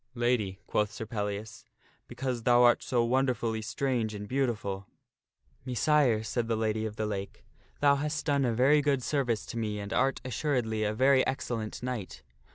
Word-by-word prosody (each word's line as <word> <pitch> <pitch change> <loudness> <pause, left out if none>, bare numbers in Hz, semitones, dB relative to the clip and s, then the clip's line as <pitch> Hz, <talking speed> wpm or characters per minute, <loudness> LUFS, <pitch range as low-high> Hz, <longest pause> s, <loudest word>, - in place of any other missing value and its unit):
" - - -36
Lady," 105 -6 0
quoth 105 -1 0
Sir 110 - -6
Pellias, 110 +1 -4 0.2
" - - -36
because 120 0 -3
thou 120 +1 +5
art 120 0 +5
so 120 -3 +1
wonderfully 120 -3 0
strange 115 -1 -1
and 105 0 -6
beauti 130 -3 0
ful." 100 -1 -5 0.4
" - - -40
Messire," 130 -2 +2
said 115 +2 -2
the 115 - +1
Lady 110 0 -1
of 105 - -8
the 110 - -2
Lake, 100 -2 -5 0.2
" - - -34
thou 140 -1 +5
hast 150 +2 -2
done 140 -2 +2
a 120 - +2
very 135 +6 +4
good 140 -3 +1
service 120 -7 0
to 115 - -5
me 105 -2 -2
and 100 0 -5
art, 135 0 +2
assuredly, 125 -5 -1
a 105 - +1
very 130 +2 +4
excellent 120 -5 -3
knight. 125 -7 -5
120 Hz, 190 wpm, -29 LUFS, 110-130 Hz, 0.4 s, thou